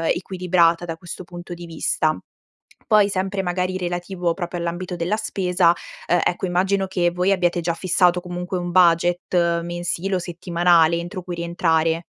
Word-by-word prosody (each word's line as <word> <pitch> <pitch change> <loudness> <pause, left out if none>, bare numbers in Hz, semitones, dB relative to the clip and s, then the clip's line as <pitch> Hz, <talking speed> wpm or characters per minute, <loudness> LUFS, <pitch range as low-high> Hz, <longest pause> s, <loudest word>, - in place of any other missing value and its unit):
equilibrata 180 -2 +1
da 165 -1 -4
questo 175 +2 -8
punto 175 0 -9
di 175 0 -9
vista. 155 -1 0 0.7
Poi, 215 -4 +5
sempre 195 0 -2
magari 180 +1 -1
relativo 175 -1 -2
proprio 175 0 -5
all'ambito 175 +1 -4
della 170 +5 0
spesa, 185 -5 +1 0.4
uhm, 175 - +3
ecco 180 +2 0
immagino 190 +2 +1
che 175 -2 +1
voi 180 +2 +1
abbiate 175 -2 +1
già 170 0 -1
fissato 180 0 +2
comunque 180 +1 -5
un 175 0 -3
budget 175 -1 +3
mensile 175 +2 -2
o - - 0
settimanale 170 -1 +2
entro 175 +3 -5
cui 180 -1 -6
rientrare. 165 -1 0
175 Hz, 155 wpm, -22 LUFS, 170-185 Hz, 0.7 s, Poi